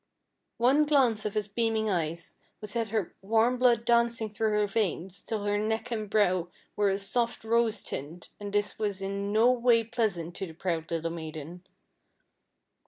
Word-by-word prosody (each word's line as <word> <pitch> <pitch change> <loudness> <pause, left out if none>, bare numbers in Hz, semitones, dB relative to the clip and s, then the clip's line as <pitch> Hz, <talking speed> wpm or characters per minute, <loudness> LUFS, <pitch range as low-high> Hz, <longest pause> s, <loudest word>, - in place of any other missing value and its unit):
One 275 +6 +4
glance 245 -7 +3
of 210 - -2
his 210 -1 0
beaming 220 +1 0
eyes 170 -3 -2 0.2
would 210 -1 -8
set 230 -1 -1
her 215 -4 -2
warm 225 +5 +2
blood 240 -2 +4
dancing 235 -2 +2
through 220 +1 0
her 210 0 +3
veins 195 -3 -2
till 215 -2 -3
her 205 0 +1
neck 220 +3 -2
and 215 -3 -3
brow 185 -5 +2 0.3
were 205 -1 +2
a 195 - +1
soft 230 +5 -1
rose 225 -1 +1
tint, 160 +6 -6
and 205 -1 -6
this 205 +1 -1
was 200 -3 -2
in 200 +1 -3
no 225 +4 +5
way 240 -2 +3
pleasant 210 -8 -2
to 195 - -3
the 160 - -10
proud 165 -1 -3
little 165 0 -2
maiden. 165 +2 -7
210 Hz, 170 wpm, -29 LUFS, 190-230 Hz, 0.3 s, no